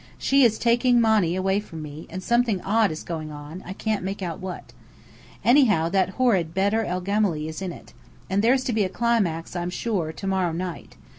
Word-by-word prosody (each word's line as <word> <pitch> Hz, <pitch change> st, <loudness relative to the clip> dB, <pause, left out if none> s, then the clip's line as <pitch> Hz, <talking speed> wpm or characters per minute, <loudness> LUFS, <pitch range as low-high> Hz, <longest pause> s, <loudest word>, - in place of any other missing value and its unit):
She 275 Hz, +1 st, +3 dB
is 225 Hz, -3 st, +4 dB
taking 240 Hz, +1 st, +3 dB
Monny 215 Hz, -7 st, +3 dB
away 190 Hz, +1 st, +1 dB
from 165 Hz, -7 st, -8 dB
me; 150 Hz, +1 st, -9 dB
and 185 Hz, +2 st, -6 dB
something 235 Hz, -3 st, +2 dB
odd 215 Hz, +1 st, +2 dB
is 155 Hz, -1 st, -6 dB
going 155 Hz, -2 st, -5 dB
on, 150 Hz, +4 st, -9 dB
I 185 Hz, -, -5 dB
can't 215 Hz, -1 st, -2 dB
make 195 Hz, +1 st, -4 dB
out 170 Hz, -3 st, -4 dB
what. 185 Hz, -1 st, -7 dB, 0.7 s
Anyhow, 225 Hz, -, +4 dB
that 190 Hz, 0 st, 0 dB
horrid 190 Hz, -10 st, +2 dB
Bedr 200 Hz, +4 st, +2 dB
el 180 Hz, -2 st, -3 dB
Gemály 195 Hz, -6 st, 0 dB
is 160 Hz, +3 st, -6 dB
in 185 Hz, -2 st, -3 dB
it. -, -, -13 dB, 0.3 s
And 195 Hz, +2 st, +1 dB
there's 255 Hz, +4 st, +3 dB
to 250 Hz, -, -1 dB
be 215 Hz, -1 st, +2 dB
a 185 Hz, -, -1 dB
climax, 195 Hz, -8 st, 0 dB
I'm 175 Hz, 0 st, -2 dB
sure, 180 Hz, -4 st, -2 dB
to 180 Hz, -, -9 dB
morrow 190 Hz, -3 st, 0 dB
night. 175 Hz, +1 st, -6 dB
190 Hz, 205 wpm, -24 LUFS, 170-220 Hz, 0.7 s, is